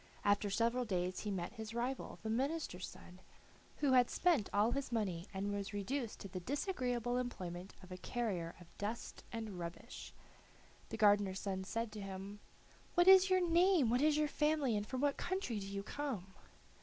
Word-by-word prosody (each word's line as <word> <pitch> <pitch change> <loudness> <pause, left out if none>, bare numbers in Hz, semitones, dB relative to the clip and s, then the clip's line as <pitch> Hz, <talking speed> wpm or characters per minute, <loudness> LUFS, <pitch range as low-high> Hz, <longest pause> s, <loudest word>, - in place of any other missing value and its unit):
After 205 0 +3
several 235 +4 +2
days 185 -4 -1
he 210 - -3
met 185 -1 -3
his 220 -1 -7
rival, 250 +3 -2
the 220 - -2
minister's 265 - -1
son, 180 +1 -12 0.6
who 285 -3 +3
had 250 -2 +6
spent 330 - +2
all 210 +3 +3
his 275 -1 -2
money 195 -6 -1
and 200 +1 -2
was 205 0 -3
reduced 230 +4 -2
to - - -5
the 185 -1 -5
disagreeable 245 - -1
employment 185 -7 -4
of 185 - -13
a 180 - -5
carrier 185 -5 -2
of 175 -2 -16
dust 215 +3 -4
and 220 -5 -5
rubbish. 170 0 -7 0.8
The 225 - -4
gardener's 205 -3 +4
son 190 -1 -2
said 230 +2 -2
to 210 -1 -6
him: 195 +1 -6 0.6
"What 350 0 +5
is 380 0 +9
your 370 -1 +4
name, 340 -6 +5
what 245 +2 +3
is 300 0 +4
your 305 0 +3
family, 300 -5 +1
and 205 0 -1
from 260 0 -3
what 285 -1 +2
country 355 - -2
do 195 - -6
you 200 0 -4
come?" 215 -8 -4
220 Hz, 180 wpm, -37 LUFS, 195-270 Hz, 0.8 s, is